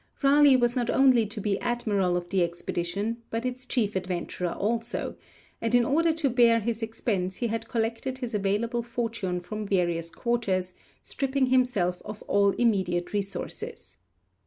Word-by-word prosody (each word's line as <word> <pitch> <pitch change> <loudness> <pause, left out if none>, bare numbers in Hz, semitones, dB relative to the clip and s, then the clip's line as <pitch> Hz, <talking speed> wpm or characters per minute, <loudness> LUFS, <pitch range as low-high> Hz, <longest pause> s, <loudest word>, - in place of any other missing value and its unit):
Raleigh 280 0 +6
was 240 -1 +2
not 245 -2 0
only 255 -5 +4
to 215 +1 -7
be 205 -1 0
admiral 205 -7 0
of 175 0 -4
the 190 0 +1
expedition, 175 +5 -2
but 230 +2 -3
its 255 0 -4
chief 215 -7 0
adventurer 180 -1 -2
also, 230 +3 -2 0.5
and 230 +1 +1
in 240 -1 +5
order 325 +5 +3
to 320 -2 0
bear 235 -2 +5
this 225 +1 -2
expense 205 -4 -2
he 240 - -2
had 225 0 -3
collected 230 +3 -2
his 245 -3 -5
available 210 +4 0
fortune 230 -6 -3
from 210 +4 -5
various 175 -4 0
quarters, 190 -4 -1 0.3
stripping 275 -1 0
himself 215 -9 +2
of 210 0 -8
all 200 0 +3
immediate 190 -7 0
resources. 200 -1 -5
225 Hz, 155 wpm, -27 LUFS, 190-240 Hz, 0.5 s, Raleigh